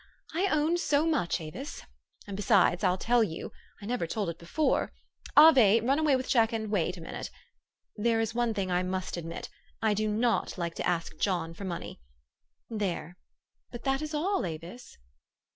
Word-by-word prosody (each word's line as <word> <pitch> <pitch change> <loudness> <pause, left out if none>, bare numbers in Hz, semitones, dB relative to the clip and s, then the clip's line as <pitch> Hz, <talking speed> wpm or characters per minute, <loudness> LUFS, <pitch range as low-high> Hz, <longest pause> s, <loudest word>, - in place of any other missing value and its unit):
I 365 +5 +1
own 310 0 +2
so 300 -3 +2
much, 295 - +1
Avis. 170 - -7 0.4
And 200 - -6
besides 200 -3 +3
I'll 180 - +3
tell 235 +4 +3
you 165 -6 -5 0.3
I - - -6
never 235 -6 -1
told 200 -1 -2
it 165 - -13
before 285 - 0 0.4
(Ave, 260 -9 +8
run 270 +6 +2
away 305 -3 +3
with 255 0 -2
Jack 230 -3 +3
and 220 -2 -3
Wait, 180 -2 0
a - - -9
minute), - - -6 0.7
there 225 +1 +1
is 225 -1 -1
one 240 -2 0
thing 190 -2 -2
I 180 0 +2
must 185 0 -3
admit: 165 -1 -6 0.3
I 220 -1 +2
do 215 +1 0
not 225 +1 0
like 170 -2 -2
to - - -1
ask 170 -1 -1
John 175 -4 0
for 195 +4 -8
money. 170 - -6 0.7
There! 185 -6 -3 0.5
But 240 - -9
that 270 0 0
is 305 0 -4
all, 380 +7 0
Avis." 170 +8 -7
215 Hz, 175 wpm, -29 LUFS, 180-260 Hz, 0.7 s, Ave